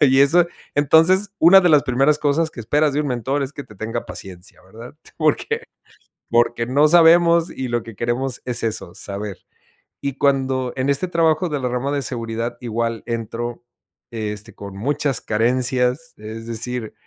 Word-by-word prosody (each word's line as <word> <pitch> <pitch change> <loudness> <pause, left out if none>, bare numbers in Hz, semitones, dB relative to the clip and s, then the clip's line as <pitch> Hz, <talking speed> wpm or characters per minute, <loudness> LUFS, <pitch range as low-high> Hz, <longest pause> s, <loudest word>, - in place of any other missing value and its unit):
Y 135 -2 +5
eso 165 +5 +5 0.3
entonces, 165 +8 +4
una 185 +4 +8
de 180 - +3
las 150 -2 +5
primeras 135 +4 +2
cosas 150 +2 +1
que 120 - -9
esperas 145 +6 +1
de 145 - 0
un 150 - -2
mentor 130 +3 -1
es 135 0 -4
que 145 - -7
te 105 - -16
tenga 115 +4 -4
paciencia, 95 -1 -9
¿verdad?, 115 +7 -12 0.2
porque 170 - 0 0.7
porque 120 0 +2
no 140 +5 +4
sabemos 170 0 +5
y 130 - -5
lo 120 -1 -1
que 115 0 -11
queremos 120 +3 -2
es 125 -2 -2
eso, 110 -6 -3
saber. 100 -1 -6 0.6
Y 140 -1 -3
cuando 130 -2 +1
en 130 +1 0
este 140 +6 +1
trabajo 165 0 +2
de 150 -2 -2
la 130 - -2
rama 125 +3 -2
de 145 -1 -1
seguridad 115 -1 -4
igual 115 -1 -2
entro, 115 +1 -4 0.5
este, 105 -2 -5
con 100 -1 -9
muchas 135 +3 -1
carencias, 125 +6 0
es 110 +2 -8
decir, 115 0 -5
130 Hz, 170 wpm, -21 LUFS, 115-145 Hz, 0.7 s, una